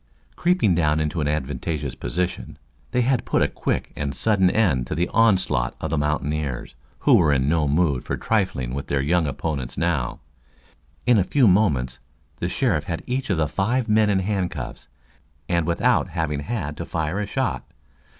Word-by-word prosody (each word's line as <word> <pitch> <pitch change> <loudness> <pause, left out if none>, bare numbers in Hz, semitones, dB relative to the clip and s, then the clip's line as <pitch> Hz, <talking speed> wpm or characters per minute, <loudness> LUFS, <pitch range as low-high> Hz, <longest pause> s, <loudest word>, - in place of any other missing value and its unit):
Creeping 175 - +2
down 80 -2 +2
into 75 +1 -1
an 75 - 0
advantageous 75 0 -2
position, 90 +10 -3 0.3
they 125 - +1
had 125 0 +1
put - - +1
a - - +3
quick 65 - -3
and 70 -1 -3
sudden 100 -4 +3
end 80 - +1
to - - -3
the 85 +2 +1
onslaught 95 - +2
of 80 - -4
the 80 - +1
mountaineers, 75 -2 -2 0.3
who - - +4
were 80 -4 +4
in 65 -1 +2
no 75 -1 +2
mood 70 -3 +1
for - - -3
trifling 90 - -1
with 70 +1 -4
their 70 - 0
young 80 +4 +1
opponents 70 -4 -4
now. 75 -8 -1 0.9
In 120 -3 +5
a - - +3
few 130 +5 +3
moments 75 -11 +2 0.4
the 90 - -2
sheriff 95 - 0
had 85 -2 -4
each 130 +1 -2
of 95 - +1
the 80 -1 +1
five 115 - 0
men 110 -1 +3
in 95 -2 +2
handcuffs, 95 -2 -3 0.6
and 85 -2 0
without 120 +7 +2
having 80 -4 -2
had 75 -2 -4
to - - -4
fire 80 +4 -2
a 105 - -2
shot. 130 +4 -1
85 Hz, 180 wpm, -23 LUFS, 70-100 Hz, 0.9 s, In